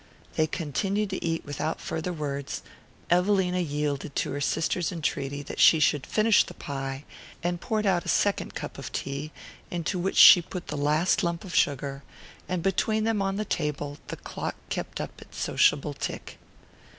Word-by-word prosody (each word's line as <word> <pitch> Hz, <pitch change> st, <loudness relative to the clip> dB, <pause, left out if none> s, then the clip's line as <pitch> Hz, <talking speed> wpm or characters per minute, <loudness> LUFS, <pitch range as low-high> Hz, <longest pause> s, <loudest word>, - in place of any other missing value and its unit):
They 155 Hz, -, +2 dB
continued 195 Hz, +6 st, -1 dB
to 190 Hz, -, -3 dB
eat 165 Hz, -1 st, -1 dB
without 150 Hz, +2 st, -3 dB
farther 160 Hz, +3 st, -3 dB
words. 140 Hz, -4 st, -4 dB, 0.5 s
Evelina 180 Hz, 0 st, +3 dB
yielded 150 Hz, -3 st, -2 dB
to -, -, 0 dB
her 145 Hz, -, -3 dB
sister's 165 Hz, +4 st, 0 dB
entreaty 145 Hz, -4 st, -2 dB
that -, -, -7 dB
she 160 Hz, -, +7 dB
should 145 Hz, -2 st, +2 dB
finish 215 Hz, 0 st, +4 dB
the -, -, -11 dB
pie, 135 Hz, -1 st, -5 dB, 0.4 s
and 175 Hz, 0 st, -1 dB
poured 220 Hz, -3 st, -1 dB
out 180 Hz, -3 st, +2 dB
a -, -, -11 dB
second 205 Hz, -1 st, +1 dB
cup -, -, -6 dB
of -, -, -6 dB
tea, 140 Hz, +3 st, -4 dB, 0.4 s
into 175 Hz, +2 st, -2 dB
which 190 Hz, +2 st, -1 dB
she 175 Hz, -, +10 dB
put 175 Hz, +1 st, -7 dB
the 150 Hz, -, -3 dB
last 150 Hz, +4 st, +2 dB
lump 170 Hz, -1 st, -1 dB
of 190 Hz, -, -8 dB
sugar; 140 Hz, -1 st, +1 dB, 0.5 s
and 180 Hz, -2 st, -1 dB
between 215 Hz, +3 st, +1 dB
them, 220 Hz, -2 st, +1 dB
on 195 Hz, 0 st, 0 dB
the 215 Hz, +1 st, -2 dB
table, 145 Hz, -4 st, -2 dB
the -, -, -5 dB
clock -, -, -5 dB
kept -, -, -4 dB
up -, -, -6 dB
its -, -, -11 dB
sociable 145 Hz, 0 st, +2 dB
tick. -, -, -6 dB
165 Hz, 175 wpm, -27 LUFS, 145-185 Hz, 0.5 s, she